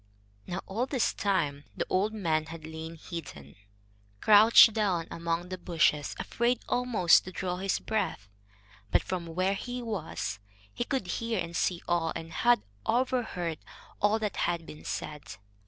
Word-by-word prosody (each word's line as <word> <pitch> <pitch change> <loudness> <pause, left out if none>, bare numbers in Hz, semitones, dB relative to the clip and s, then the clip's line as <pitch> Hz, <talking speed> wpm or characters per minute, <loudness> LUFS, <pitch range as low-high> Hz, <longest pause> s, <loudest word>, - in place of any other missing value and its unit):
Now 180 +2 -3
all 230 +7 -2
this 265 -4 +1
time 150 -8 0
the - - -1
old 200 +4 +1
man 160 -7 0
had 160 0 -8
lain 160 +1 -7
hidden, 140 - -8 0.6
crouched 220 - +8
down 190 -7 0
among 170 +1 -2
the 185 -1 -5
bushes, 160 -4 +1
afraid 240 +1 0
almost 240 -9 +4
to 185 - -7
draw 180 -1 -3
his 195 +1 0
breath, 200 - -2 0.6
but - - +3
from 180 -2 -4
where 185 +4 0
he 245 +4 -5
was 180 - -4 0.3
he 240 - -2
could 265 -7 -1
hear 225 +4 -2
and 170 -1 -4
see 175 0 0
all, 170 -2 +1
and 165 0 -7
had 240 +7 +3 0.2
overheard 225 - 0 0.4
all 205 +2 +4
that 215 -3 -3
had 170 -1 0
been 150 - -11
said. 150 -6 -5
180 Hz, 155 wpm, -29 LUFS, 165-220 Hz, 0.6 s, crouched